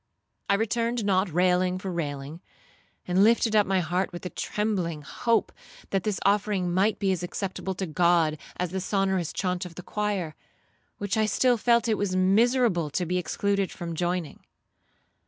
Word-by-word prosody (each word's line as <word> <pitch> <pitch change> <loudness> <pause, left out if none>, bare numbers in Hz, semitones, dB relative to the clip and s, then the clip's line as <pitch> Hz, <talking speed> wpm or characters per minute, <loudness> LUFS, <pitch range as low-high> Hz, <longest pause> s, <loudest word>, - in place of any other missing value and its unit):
I 200 - +5
returned 230 +1 0
not 190 -1 +2
'railing 180 +2 +2
for 190 0 -5
railing,' 145 -1 -4 0.7
and 180 +2 +3
lifted 225 0 +3
up 210 -1 +4
my 190 -1 +2
heart 180 +4 -1
with 175 0 -8
a 180 - -4
trembling 185 -8 -2
hope, 230 - 0 0.4
that 195 - +1
this 210 -2 -1
offering 200 -3 +1
might 200 +4 +2
be 195 -2 +1
as 185 - -1
acceptable 190 +1 -4
to 190 - -3
God 165 -2 +2 0.2
as 180 -1 -2
the 190 0 -2
sonorous 190 -3 0
chaunt 180 -1 -2
of 175 -2 -9
the 180 - -8
choir, 205 -7 -2 0.6
which 205 +2 -2
I 215 0 +2
still 245 +4 +3
felt 235 +1 +2
it 220 -2 +1
was 195 -2 -1
miserable 195 - +3
to 180 +5 -1
be 180 +2 0
excluded 200 +2 -1
from 170 -1 -6
joining. 175 -1 -2
190 Hz, 170 wpm, -26 LUFS, 175-210 Hz, 0.7 s, I